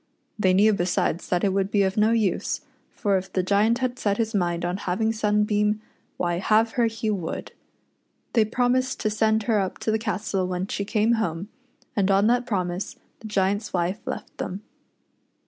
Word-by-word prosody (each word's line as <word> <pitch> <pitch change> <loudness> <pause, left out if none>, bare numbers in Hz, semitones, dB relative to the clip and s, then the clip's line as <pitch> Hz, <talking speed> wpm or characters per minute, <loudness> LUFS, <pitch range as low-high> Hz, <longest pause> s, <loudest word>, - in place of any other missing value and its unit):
They 185 -2 +3
knew 210 +3 +5
besides 175 -2 0
that 175 -1 +1
it 195 -2 +2
would 195 0 +1
be 205 -1 +3
of 190 0 0
no 215 +1 +4
use, 220 -5 0 0.3
for 200 -2 0
if 190 - -11
the 185 - 0
Giant 205 +5 +3
had 255 0 -2
set 205 -1 0
his 225 -1 -1
mind 175 -3 0
on 175 +2 -1
having 210 +4 0
Sunbeam, 210 -1 +1 0.4
why 175 -1 0
have 220 +3 +3
her 235 -1 +2
he 225 -1 -2
would. 185 -6 -4 0.8
They 230 - +5
promised 250 +3 +1
to 215 - 0
send 220 0 +2
her 215 -1 +2
up 190 -2 -2
to 220 - -1
the 220 - +1
castle 205 -3 -1
when 180 0 -2
she 200 0 -3
came 215 +2 +2
home, 175 +1 -3 0.5
and 200 -2 +2
on 195 +1 +4
that 245 +2 +2
promise 180 -3 -2 0.2
the 220 - -8
Giant's 205 +1 0
wife 180 +3 0
left - - -5
them. 190 +3 -4
205 Hz, 185 wpm, -25 LUFS, 185-220 Hz, 0.8 s, knew